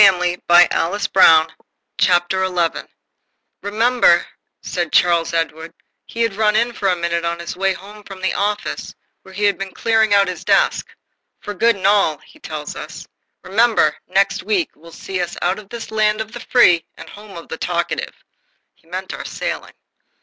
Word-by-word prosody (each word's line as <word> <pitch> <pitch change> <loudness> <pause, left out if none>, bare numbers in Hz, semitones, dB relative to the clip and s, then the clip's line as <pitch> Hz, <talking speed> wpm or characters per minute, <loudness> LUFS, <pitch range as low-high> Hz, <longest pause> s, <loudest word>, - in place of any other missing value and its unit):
PEGGY, 180 -3 +4
by 175 0 +7
Alice 200 +5 -1
Brown 160 -3 +5 2.1
"Remember," 220 -3 +3 0.4
said 175 -3 -3
Charles 170 -1 +3
Edward 165 0 -3 0.3
he 235 - -5
had 230 -3 0
run 210 0 +2
in 235 +2 +1
for 200 - -2
a 185 - +2
minute 170 0 -2
on 170 0 -2
his 170 +1 -6
way 195 +1 +1
home 205 +3 -12
from 195 -2 -11
the 190 0 -1
office 205 +1 -3 0.3
where 190 0 -15
he 205 - -3
has 205 -1 +4
been 195 -1 -8
clearing 220 -2 +2
out 200 -1 +4
his 180 -1 -5
desk, - - +2 0.5
"for 205 - -6
good 230 +4 +2
and 195 - -7
all," 195 -6 +3
he - - -21
tells 150 -1 -7
us - - -9 0.4
"remember, 225 +4 +2
next - - +1
week 380 -6 -1
will 165 +2 -16
see 185 +2 -5
us 175 - -4
out 180 +3 -1
of 205 -2 -14
this 235 -2 -8
land 215 -1 +1
of 220 0 -5
the 240 - -8
free 180 -10 +4
and - - -11
home 205 -2 -12
of 170 - -10
the 160 - -5
talkative." 170 0 -3 0.5
He - - -32
meant - - -6
our - - -6
sailing. - - -5
195 Hz, 175 wpm, -19 LUFS, 170-215 Hz, 2.1 s, by